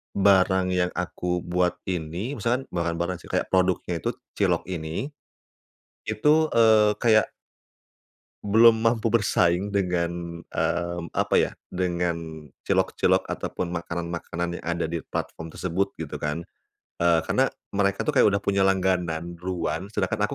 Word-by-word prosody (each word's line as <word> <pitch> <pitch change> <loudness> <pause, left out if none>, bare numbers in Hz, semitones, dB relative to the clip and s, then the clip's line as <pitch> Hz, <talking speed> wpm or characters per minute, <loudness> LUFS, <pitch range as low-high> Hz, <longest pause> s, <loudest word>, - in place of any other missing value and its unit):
barang 95 -1 +4
yang 90 0 +1
aku 90 0 -2
buat 90 0 +1
ini 90 - -3
misalkan 120 +4 -1
barang-barang 85 +1 -2
sih - - -14
kayak - - 0
produknya 90 -2 +1
tuh 120 +1 -2 0.2
cilok 90 -4 +1
ini. 85 - -4 1.0
Itu, 155 +6 +3
eee, 110 -2 +5
kayak 110 -3 +4 1.1
belum 110 +2 +5
mampu 115 0 +2
bersaing 100 -3 +2
dengan, 85 -3 -2
mmm, 85 -1 -2
apa - - +1
ya, - - +1 0.2
dengan 85 -3 -2 0.2
cilok-cilok - - +2
ataupun 90 -1 -4
makanan-makanan 85 0 -4
yang - - -13
ada 85 0 -1
di 85 +1 -2
platform 80 +1 -5
tersebut 90 +4 -2
gitu - - -6
kan. 75 +3 -2 0.6
Eee, 85 -1 +4
karena - - +2 0.2
mereka 100 -1 +1
tuh 150 - 0
kayak - - +7
udah 100 0 +2
punya 100 -1 +2
langganan 90 -3 0
ruan 90 0 -3
sedangkan 105 0 -1
aku - - -6
90 Hz, 135 wpm, -25 LUFS, 85-100 Hz, 1.1 s, kayak